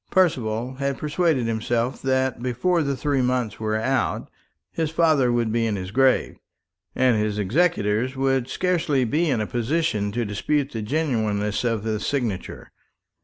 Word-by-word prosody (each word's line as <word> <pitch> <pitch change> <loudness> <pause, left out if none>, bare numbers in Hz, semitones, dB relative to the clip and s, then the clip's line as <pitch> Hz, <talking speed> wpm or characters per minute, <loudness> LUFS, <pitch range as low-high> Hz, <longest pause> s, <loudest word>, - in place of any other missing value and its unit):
Percival 130 - +1
had 140 -1 -1
persuaded 150 -4 +1
himself 115 +2 -1
that 130 -2 0
before 130 +8 +1
the 140 -3 -1
three 140 0 0
months 125 -4 -1
were 110 -1 -1
out 130 +5 -1 0.4
his 160 -2 -1
father 155 -6 +3
would 120 -2 +1
be 115 0 +1
in 105 - -1
his 95 -1 -5
grave, 130 +2 +2 0.6
and 125 -3 +3
his 105 -1 -1
executors 120 - +1
would 135 -2 +1
scarcely 165 -4 0
be 155 +8 +1
in 125 -5 +1
a 105 - 0
position 120 -3 -1
to 120 +2 -1
dispute 135 +8 -1
the 110 - -4
genuineness 110 -6 -1
of 115 -3 0
the 110 -1 -1
signature. 120 -9 -3
125 Hz, 155 wpm, -23 LUFS, 110-145 Hz, 0.6 s, father